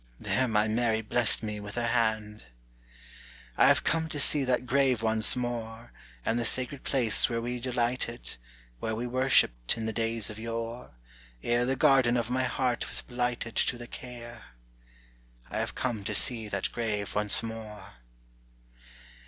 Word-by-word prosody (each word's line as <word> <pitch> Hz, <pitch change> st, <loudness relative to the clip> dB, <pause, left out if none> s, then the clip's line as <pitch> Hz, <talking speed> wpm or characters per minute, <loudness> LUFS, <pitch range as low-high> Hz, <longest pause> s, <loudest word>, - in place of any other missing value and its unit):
There 130 Hz, 0 st, 0 dB
my 105 Hz, -1 st, +2 dB
Mary 110 Hz, 0 st, +1 dB
blessed 115 Hz, +1 st, +4 dB
me 105 Hz, -1 st, -4 dB
with 105 Hz, 0 st, -8 dB
her 120 Hz, 0 st, -1 dB
hand. 110 Hz, -2 st, 0 dB, 1.1 s
"I -, -, +5 dB
have -, -, +4 dB
come 160 Hz, 0 st, 0 dB
to 150 Hz, -, -4 dB
see 145 Hz, +1 st, +3 dB
that 125 Hz, -1 st, 0 dB
grave 130 Hz, -2 st, +2 dB
once 110 Hz, -1 st, +5 dB
more, 120 Hz, -2 st, -5 dB, 0.3 s
And 115 Hz, -, +1 dB
the -, -, 0 dB
sacred 130 Hz, +4 st, -1 dB
place 120 Hz, -6 st, +2 dB
where 115 Hz, -1 st, -1 dB
we 120 Hz, +1 st, -4 dB
delighted, 120 Hz, -, -2 dB, 0.4 s
Where 110 Hz, -, -2 dB
we 120 Hz, +2 st, -3 dB
worshipped, 120 Hz, -, +2 dB
in 110 Hz, -, -4 dB
the 110 Hz, -, -2 dB
days 115 Hz, -1 st, -1 dB
of 105 Hz, -, -9 dB
yore, 115 Hz, -, -5 dB, 0.5 s
Ere 120 Hz, +1 st, +1 dB
the 135 Hz, -, +1 dB
garden 130 Hz, -2 st, +4 dB
of 120 Hz, 0 st, -2 dB
my 130 Hz, +1 st, +1 dB
heart 125 Hz, -1 st, -1 dB
was -, -, -2 dB
blighted 120 Hz, -2 st, -3 dB
To 120 Hz, -, +1 dB
the 120 Hz, -, -8 dB
care! 120 Hz, -, -9 dB, 1.1 s
I -, -, -2 dB
have -, -, -3 dB
come 120 Hz, -5 st, -2 dB
to -, -, -2 dB
see 115 Hz, -4 st, +1 dB
that 100 Hz, -2 st, -2 dB
grave 105 Hz, -4 st, -3 dB
once 105 Hz, +1 st, +4 dB
more. 105 Hz, -, -8 dB
120 Hz, 160 wpm, -28 LUFS, 110-125 Hz, 1.1 s, I